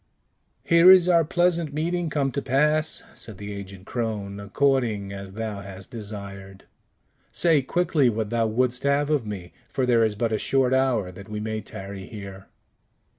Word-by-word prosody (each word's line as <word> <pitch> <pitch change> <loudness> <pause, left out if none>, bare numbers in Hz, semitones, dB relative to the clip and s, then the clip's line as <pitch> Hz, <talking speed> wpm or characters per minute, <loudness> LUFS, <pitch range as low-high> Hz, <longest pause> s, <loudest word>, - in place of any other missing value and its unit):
"Here 170 +1 +6
is 185 -2 +8
our 170 -2 +5
pleasant 170 -2 +1
meeting 170 +2 -1
come 140 -2 0
to 140 - -2
pass," 150 +4 +1
said 110 -4 -9
the 100 +1 -6
aged 100 -1 -9
crone, 105 -4 -3
"according 105 -2 0
as 100 -1 -8
thou 110 -1 -4
hast 95 -1 -10
desired. 100 -3 -8 0.7
Say 165 -4 +3
quickly 165 -2 +2
what 110 -1 -2
thou 115 -1 +1
wouldst 125 +3 0
have 140 +1 +1
of 140 -8 +1
me, 95 -4 -7 0.2
for 130 - 0
there 120 -2 +4
is 110 -2 +1
but 115 +2 -1
a 110 - 0
short 130 -1 +2
hour 125 -8 +1
that 100 +3 -12
we 105 0 -4
may 110 0 -3
tarry 95 -1 -8
here." 100 -2 -9
115 Hz, 170 wpm, -25 LUFS, 100-140 Hz, 0.7 s, is